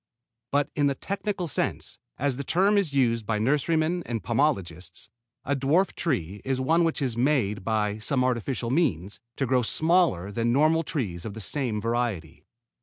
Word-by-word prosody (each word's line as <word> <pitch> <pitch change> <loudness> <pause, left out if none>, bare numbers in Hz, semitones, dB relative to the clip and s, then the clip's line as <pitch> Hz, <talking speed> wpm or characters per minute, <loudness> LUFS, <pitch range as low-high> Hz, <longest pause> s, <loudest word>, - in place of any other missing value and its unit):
But 145 +1 +1
in 145 -1 +2
the 140 - 0
technical 195 +2 -3
sense, 150 - -3 0.2
as 140 -1 0
the 140 - -4
term 190 +8 +2
is 195 -7 +2
used 115 -5 +1
by 110 - 0
nurserymen 155 +8 +1
and 115 -2 -3
pomologists, 95 - -1 0.4
a 140 - 0
dwarf 150 +8 +2
tree 100 - -2
is 135 -1 -1
one 160 +6 +3
which 165 -3 0
is 125 -4 0
made, 120 -6 +1
by 105 -1 0
some 125 +4 0
artificial 120 -1 -1
means, 105 - 0 0.2
to 135 - -1
grow 130 0 +2
smaller 160 - +2
than 115 +3 0
normal 155 +5 +3
trees 105 - -3
of 110 -2 -6
the - - -6
same 120 -1 -2
variety. 110 -8 -2
130 Hz, 170 wpm, -26 LUFS, 110-150 Hz, 0.4 s, one